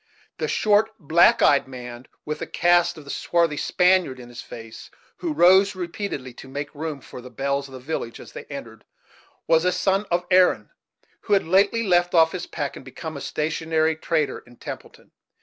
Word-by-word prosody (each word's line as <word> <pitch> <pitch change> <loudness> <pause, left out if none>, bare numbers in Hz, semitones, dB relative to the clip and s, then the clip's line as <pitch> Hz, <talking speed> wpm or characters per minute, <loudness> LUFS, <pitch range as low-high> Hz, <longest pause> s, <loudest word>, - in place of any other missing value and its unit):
The - - -1
short, 215 +1 +3
black 165 -2 +4
eyed 140 - +4
man, 125 -1 -9 0.2
with 150 0 -4
a - - -4
cast 175 0 +2
of 155 - -10
the 140 - -8
swarthy 170 -3 0
Spaniard 180 -8 +2
in 120 -1 -11
his 120 - -9
face, 115 -1 -11 0.3
who 335 - -3
rose 190 -4 +5
repeatedly 170 - -5
to - - -12
make 145 +2 -6
room 150 -2 -5
for 125 - -10
the 125 - -11
belles 140 +1 -2
of 135 - -12
the - - -8
village 125 -4 -5
as - - -12
they - - -9
entered, - - -9 0.6
was 160 0 +3
a 180 - +2
son 195 +3 0
of 175 +1 0
Erin, 185 0 +4 0.5
who 210 - +1
had 195 - +3
lately 200 +6 +3
left 175 -3 +2
off 165 -1 +5
his 180 -1 -5
pack, 145 -4 -4
and - - -10
become 155 +4 -8
a 140 - -6
stationary 160 +1 0
trader 160 -1 -1
in 120 0 -19
Templeton. - - -10
160 Hz, 190 wpm, -23 LUFS, 140-180 Hz, 0.6 s, rose